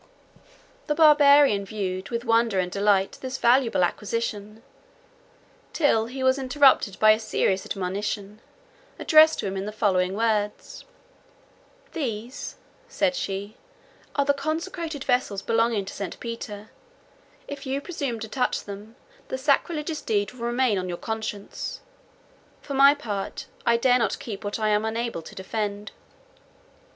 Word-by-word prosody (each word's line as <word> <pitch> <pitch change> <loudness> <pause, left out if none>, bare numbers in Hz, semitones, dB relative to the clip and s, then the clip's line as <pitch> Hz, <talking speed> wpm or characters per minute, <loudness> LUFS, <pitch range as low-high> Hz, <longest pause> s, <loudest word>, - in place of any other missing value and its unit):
The 295 - 0
Barbarian 290 -8 +6
viewed 190 -2 -4
with 235 0 -3
wonder 230 -3 +2
and 180 -1 0
delight 200 -1 +1
this 260 0 -4
valuable 235 -5 +3
acquisition, 215 +2 -3 1.1
till 225 -8 +2
he 260 +2 -5
was 260 +1 +3
interrupted 265 -7 +3
by 215 0 +7
a 215 - +3
serious 195 -3 0
admonition, 200 +2 -4 0.6
addressed 315 0 +6
to - - -5
him 195 0 -3
in 195 +1 -4
the - - -4
following 190 -3 +1
words: 215 -2 -2 1.1
"These," 245 - -5 0.3
said 295 - +1
she, 200 0 -4 0.6
"are 280 - +2
the 285 - +3
consecrated 315 0 -4
vessels 245 -6 0
belonging 225 -3 +1
to 190 - -8
St. 195 -2 -6
Peter: 220 -3 -7 0.8
if 280 -1 -7
you 270 +1 -1
presume 280 -7 -4
to 220 - -4
touch 250 +3 -1
them, 205 +3 -10 0.3
the - - -3
sacrilegious 300 +3 0
deed 205 -2 0
will 235 -2 -5
remain 240 -4 +1
on 185 0 -4
your 175 - -4
conscience. 220 -2 -5 0.8
For 280 - -6
my 275 +1 +6
part, 205 -9 -5 0.2
I 235 0 +5
dare 250 +1 +3
not 225 -4 0
keep 210 -3 -7
what 205 0 -3
I 215 -1 0
am 210 0 +2
unable 225 -4 -2
to 160 - -12
defend." 205 +1 -4
225 Hz, 140 wpm, -25 LUFS, 205-265 Hz, 1.1 s, by